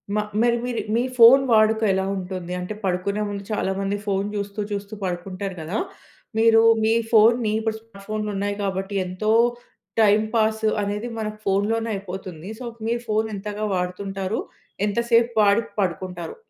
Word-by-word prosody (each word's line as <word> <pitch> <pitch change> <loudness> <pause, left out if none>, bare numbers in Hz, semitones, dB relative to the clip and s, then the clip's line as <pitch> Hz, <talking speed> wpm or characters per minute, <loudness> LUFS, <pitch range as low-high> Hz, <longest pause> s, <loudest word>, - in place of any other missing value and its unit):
మా 210 - +2 0.2
మరి 235 0 +3
మీరు 245 -1 -2
మీ 235 - +2
ఫోన్ 240 +3 +9
వాడుక 220 0 +4
ఎలా 190 0 0
ఉంటుంది? 180 -1 -5
అంటే 180 +4 -4
పడుకునే 190 +3 -1
ముందు 200 -1 -5
చాలామంది 195 0 -1
ఫోన్ 195 0 0
చూస్తూ 200 +1 -4
చూస్తూ 200 +1 -4
పడుకుంటారు 185 +1 -4
కదా, 160 +6 -3 0.6
మీరు 225 0 +6 0.2
మీ 225 - +3 0.2
ఫోన్ని 225 0 +5
ఇప్పుడు 220 0 -2
స్మార్ట్ 220 -3 -16
ఫోన్‌లు 215 0 -2
ఉన్నాయి 200 +1 -1
కాబట్టి, 195 +1 -3
ఎంతో 185 +4 -1 0.7
టైమ్ 215 0 +4
పాస్ 220 0 +1 0.2
అనేది 205 +3 -2
మనకు 215 -1 -4
ఫోన్‌లోనే 215 +4 +1
అయిపోతుంది. 185 -2 -7
సో, 255 - -6 0.2
మీరు 235 +1 -1
ఫోన్ 215 +1 +2
ఎంతగా 210 +1 -4
వాడుతుంటారు? 190 +3 -3 0.5
ఎంతసేపు 235 +2 +2
వాడి 205 +2 +4 0.2
పడుకుంటారు? 180 - -3
205 Hz, 145 wpm, -23 LUFS, 190-220 Hz, 0.7 s, ఫోన్